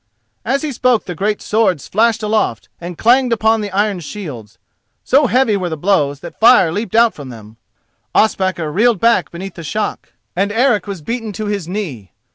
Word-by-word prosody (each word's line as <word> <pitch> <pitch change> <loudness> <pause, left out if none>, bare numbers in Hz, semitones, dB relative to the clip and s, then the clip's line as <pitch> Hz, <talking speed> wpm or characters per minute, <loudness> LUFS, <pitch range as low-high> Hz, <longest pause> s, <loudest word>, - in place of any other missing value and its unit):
As 270 +5 -1
he 305 - -2
spoke 250 -2 +1
the 180 - -5
great 205 +5 -2
swords 210 -8 0
flashed 225 +1 +1
aloft 210 - -1
and 175 -1 -7
clanged 250 +2 +3
upon 220 0 +2
the 205 - -4
iron 200 0 0
shields. 145 - -8 0.5
So 275 +1 +3
heavy 245 -4 +2
were 185 -3 -2
the 160 - -4
blows 145 -5 +1
that - - -10
fire 230 -7 +6
leapt 205 +3 -4
out 230 0 +5
from 140 -3 -10
them. 110 -2 -12 0.6
Ospakar 185 -7 +1
reeled 220 +4 +2
back 235 +3 +2
beneath 185 +2 -8
the 170 - -9
shock, 210 +8 -4 0.2
and 200 +3 0
Eric 225 -3 +1
was 195 -6 -6
beaten 230 +2 -4
to 215 +3 -5
his 205 -5 -3
knee. 160 - -5
205 Hz, 185 wpm, -17 LUFS, 170-225 Hz, 0.6 s, fire